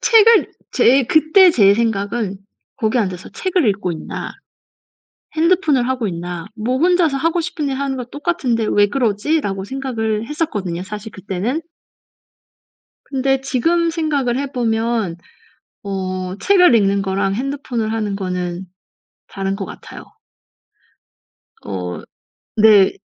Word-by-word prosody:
책을 455 -2 +5 0.2
제 265 +3 +4
그때 315 - +5
제 200 -9 +5
생각은 205 -2 -1 0.4
'거기에 220 +2 +1
앉아서 185 -4 -4
책을 365 - 0
읽고 195 -3 -1
있나 160 - -6 1.0
핸드폰을 315 -6 +2
하고 255 -4 -1
있나 175 -1 -5
뭐 235 +4 -1
혼자서 340 -2 +3
하고 330 +4 +1
싶은 315 -4 -3
일 270 - -2
하는 275 -1 -2
거 250 - -3
똑같은데 265 -5 -1
왜 205 0 +4
그러지?'라고 215 -2 0
생각을 225 -4 -2
했었거든요, 205 - -3
사실 210 +2 -7
그때는. 200 - -3 1.4
근데 270 -1 0
지금 330 +6 +1
생각을 290 -7 0
해 280 0 -4
보면 225 -5 -1 0.7
어 185 -1 -4
책을 360 - +5
읽는 200 -2 +3
거랑 195 0 -1
핸드폰을 250 -3 -3
하는 210 -3 -2
거는 180 -1 -4 0.6
다른 195 0 -3
것 195 -1 -5
같아요. - - -10 1.6
어 90 -3 -5 0.5
네. 210 - +6
230 Hz, 250 characters per minute, -19 LUFS, 195-285 Hz, 1.6 s, 네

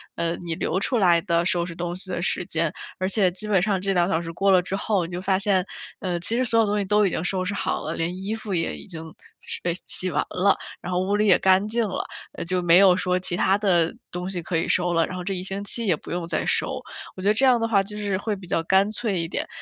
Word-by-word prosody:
呃， 170 0 -1
你 170 -2 -4
留 170 +2 -1
出 245 +5 +2
来 175 -5 +4
的 170 -2 0
收 175 -1 +1
拾 170 - -6
东 175 0 -4
西 185 +1 -4
的 175 - -2
时 175 0 -1
间。 165 -2 0 0.3
而 185 0 0
且 195 -3 +3
基 195 +4 -4
本 200 -4 +3
上 195 -1 0
这 195 0 0
2 175 -1 +2
小 165 -3 +1
时 165 -1 -6
过 195 +4 +1
了 185 -1 +5
之 180 +2 -4
后， 200 -3 0
你 170 - -9
就 175 +1 -4
发 190 0 +1
现， 195 -2 +2 0.3
呃， 180 -2 -2
其 220 +7 +1
实 255 - +1
所 230 -1 +2
有 225 - +4
东 210 0 0
西 205 - -1
都 210 +1 +3
已 - - +1
经 160 - -2
收 185 +1 -1
拾 185 +2 -2
好 - - -2
了， 160 - -4
连 170 +2 -2
衣 205 +3 -2
服 220 -3 -6
也 165 -2 -1
已 - - -11
经 165 -5 -7 0.4
收 - - -4
呃， 175 - +1
洗 185 0 +2
完 - - 0
了， 195 +2 +2 0.3
然 180 - -5
后 180 - +1
屋 190 +2 0
里 210 +1 +2
也 195 - +5
干 190 +2 +3
净 225 0 0
了。 190 - -3 0.3
呃， - - -6
就 180 +1 0
没 175 0 +5
有 190 -1 +6
说 180 0 0
其 180 -1 0
它 190 +2 +2
的 175 -5 +2 0.2
东 180 +1 -4
西 185 -2 -1
可 170 - -3
以 165 - +1
收 175 -1 +2
了， 165 -1 +2
然 185 - -6
后 180 - -5
这 195 +2 -2
一 180 - -3
星 195 +2 -1
期 225 +2 0
也 180 - +3
不 - - -11
用 175 -1 -3
再 165 -2 -1
收。 - - 0 0.4
我 185 - -8
觉 - - 0
得 210 - +5
这 225 - +3
样 250 -2 +5
的 230 - 0
话 205 -3 +3
就 210 +2 -7
是 200 -2 -1
会 210 +1 -2
比 190 -2 -11
较 165 - 0
干 190 +5 +2
脆 215 -4 -1
一 165 - -2
点， - - -3
185 Hz, 315 characters per minute, -24 LUFS, 175-200 Hz, 0.4 s, 有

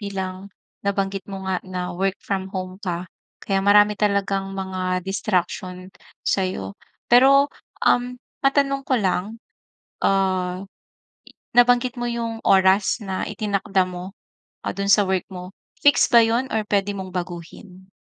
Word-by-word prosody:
bilang 190 -1 -5 0.3
nabanggit 195 -1 -1
mo 190 -1 -6
nga 185 -1 -1
na 180 -1 -5
work 195 +2 -1
from 190 -1 -4
home 185 0 -6
ka, 180 -2 -3 0.4
kaya 195 -1 +1
marami 205 +1 +5
talagang 200 -1 0
mga 185 -1 -2
distraction 185 -2 -2 0.4
sa'yo. 185 - -1 0.3
Pero, 270 +3 +6 0.4
um, 245 0 +2 0.3
matanong 275 0 +2
ko 270 - 0
lang, 200 +2 -1 0.6
ah, 185 -1 +1 0.9
nabanggit 245 +1 +4
mo 240 - -2
yung 230 -1 -3
oras 190 +1 +4
na 190 -2 -3
itinakda 200 -2 0
mo, 180 +2 -8 0.5
ah, - - -2
dun 200 0 -3
sa 205 0 +5
work 190 -1 -1
mo, 180 -1 -8 0.3
fix 290 - +5
ba 235 -1 +7
yun 235 +4 0
or 220 -1 -1
puwede 205 -1 0
mong 190 -1 -6
baguhin? 180 +2 -7
195 Hz, 135 wpm, -22 LUFS, 185-210 Hz, 0.9 s, ba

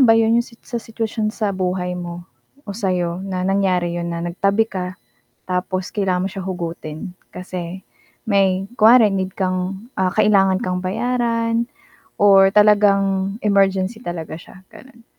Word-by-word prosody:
ba 225 -3 +6
yun 225 +1 +3
yung 235 - -5
sit 230 - -18
sa 240 -1 -4
sitwasyon 220 -1 -3
sa 215 -2 -2
buhay 180 -1 -2
mo 175 -1 -6 0.4
o 205 - -6
sa'yo 180 -4 -1
na 185 -1 -3
nangyari 185 -3 +1
yun 170 0 -3
na 170 0 -4
nagtabi 195 +5 +1
ka 185 -1 -4 0.5
tapos 185 0 -2
kailangan 190 -3 0
mo - - -7
siya 190 -1 -6
hugutin 170 -2 -5 0.2
kasi 180 0 -7 0.4
may 195 -2 +2
kunwari 225 +1 +7
need 190 -1 -2
kang, 190 +3 -2
ah, 185 -1 +1
kailangan 195 -2 +3
kang 180 0 -2
bayaran 230 +2 0 0.6
or 195 -1 +7
talagang 200 -2 +3
emergency 195 +1 +2
talaga 165 -6 -5
siya, 185 +2 -15
gano'n. 240 -3 -16
195 Hz, 145 wpm, -20 LUFS, 180-210 Hz, 0.6 s, kunwari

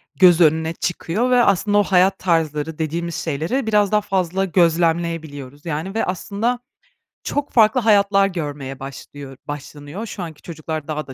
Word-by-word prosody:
göz 180 -2 +6
önüne 160 +1 +3
çıkıyor 180 +8 -2
ve 245 -1 +5
aslında 205 +1 +2
o 205 - +5
hayat 190 0 +3
tarzları 160 -3 0
dediğimiz 165 +2 -3
şeyleri 165 - -2
biraz 210 -2 +3
daha 210 - +3
fazla 190 -1 -1
gözlemleyebiliyoruz. 165 -5 0
Yani, 165 +4 -3
ve 225 - +1
aslında 205 +6 -2 0.6
çok 290 0 -2
farklı 225 +2 +4
hayatlar 200 -2 +4
görmeye 145 -7 -5
başlıyor 135 0 -9
başlanıyor. 145 +7 -7
Şu 195 -4 -6
anki 160 -3 -9
çocuklar 155 -2 -6
daha 155 -2 -4
da 135 - -8
170 Hz, 150 wpm, -20 LUFS, 155-200 Hz, 0.6 s, göz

